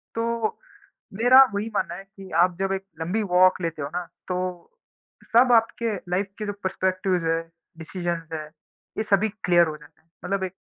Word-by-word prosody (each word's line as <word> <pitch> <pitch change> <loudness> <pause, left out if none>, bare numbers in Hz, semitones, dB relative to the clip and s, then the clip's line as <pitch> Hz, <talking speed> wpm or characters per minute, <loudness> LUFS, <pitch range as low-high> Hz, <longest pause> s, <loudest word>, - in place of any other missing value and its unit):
तो 230 -1 -1 0.6
मेरा 245 +5 +7
वही 205 +2 -2
मानना 170 - -1
है 195 +2 -9
कि 195 -1 -13
आप 180 -1 +2
जब 195 0 0
एक 195 0 -3 0.2
लंबी 180 +7 -1
वॉक 185 0 +5
लेते 165 -3 -3
हो 140 - -3
ना, 180 - -2 0.2
तो 180 - -3 0.7
सब 245 +1 +6
आपके 230 -1 +2 0.2
लाइफ़ 190 +3 +1
के 210 - -4
जो 205 - -2
पर्सपेक्टिव्स 185 -1 0
हैं, 165 0 +1 0.4
डिसीज़न्स 170 0 -4
हैं, 155 -1 -4 0.5
ये 220 - 0
सभी 205 +3 +3 0.2
क्लियर 175 -2 +5
हो 155 - -5
जाता 150 -1 -20
है, 160 - -40 0.2
मतलब 195 +1 -1
एक 185 0 -5
185 Hz, 180 wpm, -24 LUFS, 175-210 Hz, 0.7 s, मेरा